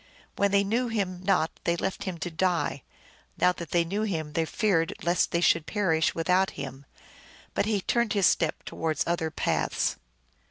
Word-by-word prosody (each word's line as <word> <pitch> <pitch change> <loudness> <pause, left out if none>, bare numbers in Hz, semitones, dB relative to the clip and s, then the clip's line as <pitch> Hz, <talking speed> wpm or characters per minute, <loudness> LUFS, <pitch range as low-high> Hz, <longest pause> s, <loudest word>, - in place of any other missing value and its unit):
When 200 - +2
they 200 0 +3
knew 230 +5 0
him 195 -6 -2
not 185 -4 +2
they 170 - +1
left 190 +3 -3
him 185 -3 -3
to 175 - -3
die; 170 -4 0 0.6
now 180 - +4
that 170 -2 -7
they 170 -1 +3
knew 195 +5 -2
him 160 -8 -2
they 165 +1 +1
feared 165 -1 +1
lest 175 +1 +2
they 170 - 0
should 165 -2 +3
perish 165 -7 +1
without 180 +3 +2
him. 135 +1 -7 0.7
But - - 0
he 210 -3 +1
turned 235 +2 +1
his 200 -3 +3
steps 165 -3 +2
towards 160 -3 -1
other 170 -2 0
paths. 155 - 0
180 Hz, 175 wpm, -27 LUFS, 165-200 Hz, 0.7 s, now